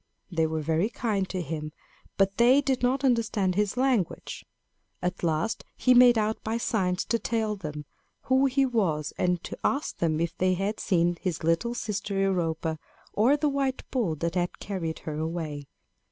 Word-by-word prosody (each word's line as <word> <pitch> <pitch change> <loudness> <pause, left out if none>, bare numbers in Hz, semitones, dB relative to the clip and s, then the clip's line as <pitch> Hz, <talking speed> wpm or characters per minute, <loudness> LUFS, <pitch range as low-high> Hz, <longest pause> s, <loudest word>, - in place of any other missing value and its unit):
They 165 -2 +1
were 160 -1 -2
very 165 +7 +1
kind 210 -6 -1
to 185 -2 -3
him, 155 0 -5 0.4
but 195 0 +2
they 245 +4 +6
did 270 -2 0
not 260 +3 +1
understand 225 -7 +2
his 210 +4 0
language. 250 -9 0 0.6
At 180 +1 -3
last 165 +5 -1
he 255 - +4
made 245 -1 +7
out 215 0 -1
by 220 +1 -1
signs 190 -6 0
to 230 - 0
tell 220 -1 -1
them 150 -6 -6 0.4
who 265 +1 +3
he 270 +1 +2
was, 180 - 0
and 180 -1 +1
to - - -6
ask 280 +2 0
them 160 -2 +1
if 170 0 -1
they 185 0 +2
had 200 +4 -2
seen 175 -1 +1
his 175 -5 -2
little 165 +9 +1
sister 200 -3 -3
Europa 165 -4 0 0.3
or 250 +8 +4
the 300 0 +1
white 275 -2 -1
bull 220 -12 0
that 165 +3 -2
had 175 -1 -1
carried 170 -6 -4
her 155 -1 -3
away. 155 -3 -4
195 Hz, 175 wpm, -27 LUFS, 165-235 Hz, 0.6 s, made